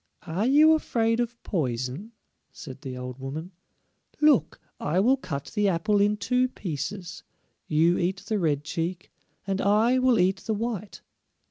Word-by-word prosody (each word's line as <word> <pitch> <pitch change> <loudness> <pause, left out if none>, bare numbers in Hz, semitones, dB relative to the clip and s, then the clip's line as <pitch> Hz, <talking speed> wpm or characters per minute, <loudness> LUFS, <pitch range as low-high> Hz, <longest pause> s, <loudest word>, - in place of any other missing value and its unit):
"Are 185 +7 -1
you 305 +4 +6
afraid 230 -7 +1
of 240 0 -2
poison?" 135 - -3 0.4
said 135 -2 -10
the 130 -3 -6
old 125 0 -7
woman. 150 +7 -6 0.7
"Look, 290 - +3 0.2
I 165 +5 0
will 245 +7 +4
cut 140 - -6
the 210 -1 +2
apple 200 +4 +1
in 210 +1 +2
two 250 +4 +1
pieces; 180 - -5 0.5
you 165 +3 +3
eat 185 +2 -1
the 215 -1 -1
red 150 -5 0
cheek, 170 +3 -4 0.3
and 195 0 -1
I 220 +5 +3
will 255 -2 +3
eat 185 +1 +3
the 220 +3 -3
white." 215 -2 -4
195 Hz, 150 wpm, -26 LUFS, 155-230 Hz, 0.7 s, you